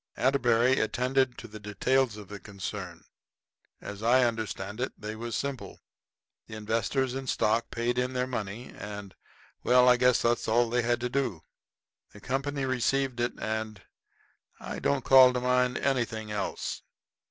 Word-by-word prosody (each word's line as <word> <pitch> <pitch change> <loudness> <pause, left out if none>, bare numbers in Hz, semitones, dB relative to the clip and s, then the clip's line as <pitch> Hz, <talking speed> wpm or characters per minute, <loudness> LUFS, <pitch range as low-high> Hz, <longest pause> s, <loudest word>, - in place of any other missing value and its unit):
Atterbury 125 -1 +3
attended 125 +3 +1
to 115 - -9
the 110 0 -10
details 115 +3 0
of 105 -2 -10
the 100 +1 -8
concern. 100 -1 -7 0.8
As 100 0 -8
I 125 +3 +4
understand 110 -2 -3
it, 130 - -2
they 110 0 -5
was 115 0 -5
simple. 140 -2 -4 0.7
The - - -8
investors 115 +4 -1
in 135 0 -5
stock 115 0 +1
paid 120 +1 -1
in 125 +1 -1
their 125 0 0
money, 115 -2 -5
and 100 -1 -8 0.5
well, 125 0 +5
I 125 -1 +6
guess 125 0 +4
that's 120 0 +1
all 115 +1 +2
they 125 0 +2
had 120 0 0
to 125 - -1
do. 120 -11 -2 0.7
The 105 - -12
company 135 +4 -2
received 130 0 0
it, 120 0 0
and 110 -1 -3 0.8
I - - -6
don't 140 -2 0
call 130 -1 +8
to 125 - 0
mind 125 0 +1
anything 115 -5 -1
else. 105 -1 -3
120 Hz, 155 wpm, -28 LUFS, 110-130 Hz, 0.8 s, call